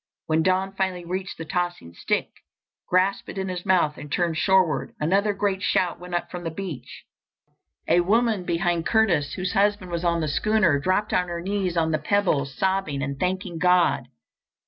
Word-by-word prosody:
When 160 0 +2
Don 185 +2 +1
finally 190 -2 -2
reached 185 +2 -4
the 165 - -6
tossing 175 - -3
stick, - - -1 0.6
grasped 185 +2 +1
it - - -7
in 190 0 -2
his 180 +1 -5
mouth 170 -5 +2
and 145 0 -9
turned 170 0 0
shoreward, 170 -4 +2
another 195 +7 +2
great 195 -1 -1
shout 180 -2 +1
went 180 0 -6
up 175 - -3
from 180 -1 -6
the 165 - -2
beach. 165 -4 -7 0.8
A 170 +2 +4
woman 220 +1 +2
behind 170 -1 0
Curtis, 185 -11 +2
whose 185 0 -3
husband 200 -2 +1
was 170 0 -2
on 170 -1 +1
the 155 - -1
schooner, 185 -2 +2
dropped 185 +7 0
on 180 - +2
her 170 -1 -4
knees 185 -1 -2
on 160 -1 +2
the 155 - +1
pebbles, 150 -5 0
sobbing 190 -8 0
and 140 -1 -4
thanking 185 -2 -2
God. 170 -8 +3
180 Hz, 180 wpm, -24 LUFS, 165-190 Hz, 0.8 s, A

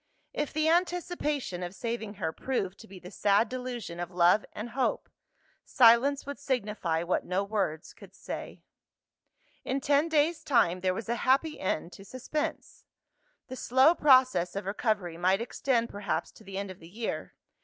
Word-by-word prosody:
If 295 - -2
the 310 +1 0
anticipation 330 - 0
of 180 +1 -5
saving 225 -1 -4
her 160 -5 -3
proved 200 -6 -3
to 225 - -13
be 195 - -11
the 180 +1 -11
sad 205 +2 +2
delusion 245 -9 -5
of 175 -1 -4
love 180 +3 +4
and 225 +3 -7
hope, 260 +1 -1 0.6
silence 255 +4 +4
would 285 0 -6
signify 210 -11 -1
what 175 - 0
no 185 +2 -1
words 195 -7 -2
could - - -15
say. - - -7 1.0
In 265 - -1
ten 285 +4 +2
days' 315 +1 +2
time, 185 -9 +2
there 185 0 +1
was 225 - -5
a 235 +1 -1
happy 280 +4 +2
end 175 -1 -2
to 195 - -11
suspense. 275 - -5 0.6
The 255 - -7
slow 260 +5 +4
process 255 - +4
of 200 - -4
recovery 195 -4 -1
might 185 +3 +2
extend 235 0 0
perhaps 205 0 -3
to - - -17
the 195 -1 -7
end 200 -1 -4
of 185 - -12
the 165 - -13
year. 220 +4 -5
220 Hz, 165 wpm, -29 LUFS, 185-265 Hz, 1.0 s, love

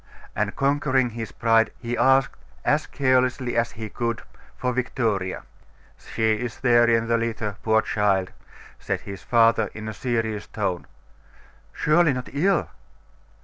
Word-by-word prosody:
And, 105 0 -1
conquering 135 -3 +1
his 115 -1 -6
pride, 115 -1 +3
he 120 0 -4
asked, 135 +2 +3 0.3
as 150 +1 +2
carelessly 130 -2 +1
as 115 0 0
he 110 0 -6
could, 115 +2 -3 0.3
for 125 0 -1
Victoria. 110 -7 -1 0.5
'She 110 -1 -1
is 120 -2 -5
there 120 -2 +5
in 115 0 +2
the 115 0 +2
litter, 110 -3 -3
poor 110 0 +2
child!' 100 -3 +1 0.5
said - - -3
her 100 - -7
father 115 +1 +3
in 110 0 -7
a 110 - -4
serious 110 -3 -2
tone. 95 -5 -3 0.8
'Surely 155 0 +3
not 125 -1 -5
ill? 190 +8 +2
115 Hz, 140 wpm, -24 LUFS, 110-130 Hz, 0.8 s, there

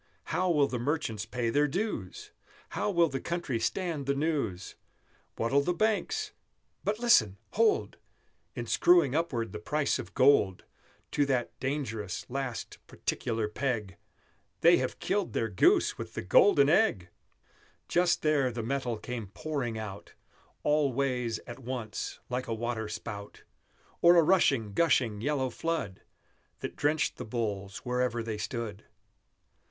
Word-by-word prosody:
How 185 0 +1
will 150 -4 +4
the 125 - -3
merchants 115 -6 -2
pay 115 0 -1
their 145 +4 +3
dues? 145 - -4 0.4
How - - -1
will 170 -4 +4
the 135 -3 -4
country 170 -9 -2
stand 160 0 -2
the 140 - +2
news? 140 - -2 0.6
What'll 135 +5 +2
the 175 +5 -1
banks 420 - 0 0.5
but 210 +1 0
listen! 115 - +4
hold! 440 -3 +2 0.6
In - - -4
screwing 350 0 +4
upward 120 - -1
the 105 - -6
price 150 +6 0
of - - -8
gold 130 -9 +4 0.5
To 145 -1 +2
that 130 -3 0
dangerous, 115 -8 -3
last, 135 -3 -4
particular 115 -2 -2
peg, 105 -5 -2 0.6
They - - +7
have - - -2
killed 200 -1 -1
their 115 - 0
Goose 95 - +3
with - - -7
the - - -3
Golden 140 - +5
Egg! 150 - +2 0.8
Just 175 0 +2
there 145 -4 +2
the 115 -1 -4
metal 125 -1 -2
came 115 -1 -5
pouring 120 +1 -3
out, 105 -2 -8 0.5
All 150 -2 +2
ways 125 -3 -1
at 120 +2 -9
once, 125 -4 -5
like 125 +1 -3
a 115 - -1
water 115 -1 -3
spout, 105 -1 -7 0.6
Or 175 +1 +7
a 170 - +7
rushing, 135 - +3
gushing, 125 -8 +2
yellow 135 -1 0
flood, 155 - -3 0.6
That - - -5
drenched 150 +1 0
the - - -5
bulls 105 -4 -3
wherever 125 -1 0
they 110 -2 -4
stood! 110 -3 -5
130 Hz, 140 wpm, -30 LUFS, 110-155 Hz, 0.8 s, They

